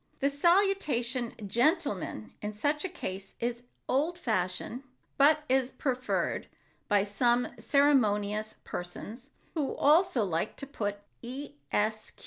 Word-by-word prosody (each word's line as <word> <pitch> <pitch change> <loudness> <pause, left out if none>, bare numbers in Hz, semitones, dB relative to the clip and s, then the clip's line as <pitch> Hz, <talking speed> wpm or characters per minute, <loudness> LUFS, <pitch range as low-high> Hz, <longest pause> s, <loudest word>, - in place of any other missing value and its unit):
The 280 +1 +2
salutation 285 - +2
"Gentlemen" 235 - 0
in 210 0 -3
such 290 +7 0
a 380 - -2
case 195 - -6
is 240 0 -2 0.3
old 310 +7 +1
fashioned 215 - -1 0.3
but 300 +2 +5
is 260 -1 +2
preferred 255 -2 -1 0.4
by 205 -2 +4
some 240 +4 +2
ceremonious 215 -5 +2
persons 215 +8 -7 0.2
who 300 -5 -1
also 295 - +4
like 175 +1 -1
to 275 - -5
put 205 -7 -3 0.2
"Esq." 235 -5 -3
245 Hz, 110 wpm, -30 LUFS, 210-290 Hz, 0.4 s, but